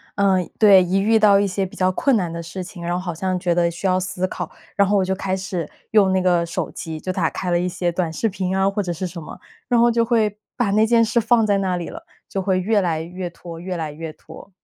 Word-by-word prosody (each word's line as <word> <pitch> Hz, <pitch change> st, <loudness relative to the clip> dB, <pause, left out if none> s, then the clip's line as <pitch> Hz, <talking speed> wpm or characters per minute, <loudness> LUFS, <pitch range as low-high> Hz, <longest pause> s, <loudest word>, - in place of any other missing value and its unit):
嗯， 190 Hz, -3 st, +2 dB
对， 200 Hz, -3 st, +7 dB
一 180 Hz, +2 st, 0 dB
遇 220 Hz, +2 st, +3 dB
到 205 Hz, -2 st, +6 dB
一 -, -, +2 dB
些 195 Hz, 0 st, -1 dB
比 185 Hz, -, -10 dB
较 185 Hz, 0 st, +2 dB
困 265 Hz, +8 st, +2 dB
难 180 Hz, -6 st, 0 dB
的 170 Hz, 0 st, -5 dB
事 180 Hz, +3 st, -6 dB
情， 180 Hz, 0 st, -10 dB
然 170 Hz, 0 st, -2 dB
后 -, -, 0 dB
好 175 Hz, -2 st, -4 dB
像 185 Hz, +3 st, -2 dB
觉 175 Hz, -1 st, 0 dB
得 170 Hz, 0 st, +2 dB
需 170 Hz, +3 st, -7 dB
要 185 Hz, -1 st, +3 dB
思 185 Hz, 0 st, -2 dB
考， 180 Hz, -3 st, -5 dB, 0.3 s
然 200 Hz, -1 st, +4 dB
后 205 Hz, -, +2 dB
我 195 Hz, -, +3 dB
就 190 Hz, -, 0 dB
开 190 Hz, 0 st, -2 dB
始 185 Hz, -4 st, -4 dB, 0.2 s
用 200 Hz, -3 st, +4 dB
那 190 Hz, -, +2 dB
个 175 Hz, -2 st, +2 dB
手 170 Hz, -, -4 dB
机， 160 Hz, -2 st, -6 dB
就 185 Hz, -, -3 dB
打 180 Hz, -3 st, 0 dB
开 185 Hz, -2 st, -4 dB
了 175 Hz, -, +3 dB
一 180 Hz, -, -1 dB
些 175 Hz, -1 st, -1 dB
短 170 Hz, -1 st, -1 dB
视 225 Hz, +7 st, 0 dB
频 190 Hz, -1 st, -2 dB
啊 190 Hz, 0 st, +3 dB
或 200 Hz, +1 st, -1 dB
者 180 Hz, -3 st, -3 dB
是 180 Hz, +3 st, -4 dB
什 175 Hz, -1 st, -6 dB
么， 155 Hz, -, -9 dB, 0.3 s
然 245 Hz, -, +2 dB
后 235 Hz, +1 st, +5 dB
就 230 Hz, 0 st, +2 dB
会 220 Hz, -3 st, +1 dB, 0.2 s
把 240 Hz, -5 st, 0 dB
那 215 Hz, +2 st, +4 dB
件 230 Hz, 0 st, +4 dB
事 225 Hz, +2 st, +2 dB
放 230 Hz, 0 st, +3 dB
在 205 Hz, -1 st, +2 dB
那 190 Hz, -2 st, 0 dB
里 175 Hz, -1 st, -4 dB
了， 330 Hz, -, -9 dB, 0.3 s
就 195 Hz, -, -2 dB
会 185 Hz, -1 st, +1 dB
越 210 Hz, +3 st, +2 dB
来 165 Hz, -4 st, 0 dB
越 175 Hz, +2 st, -6 dB
拖、 170 Hz, -1 st, -10 dB
越 180 Hz, +1 st, -5 dB
来 160 Hz, -3 st, -3 dB
越 155 Hz, +1 st, -7 dB
拖。 -, -, -14 dB
185 Hz, 300 characters per minute, -21 LUFS, 175-200 Hz, 0.3 s, 对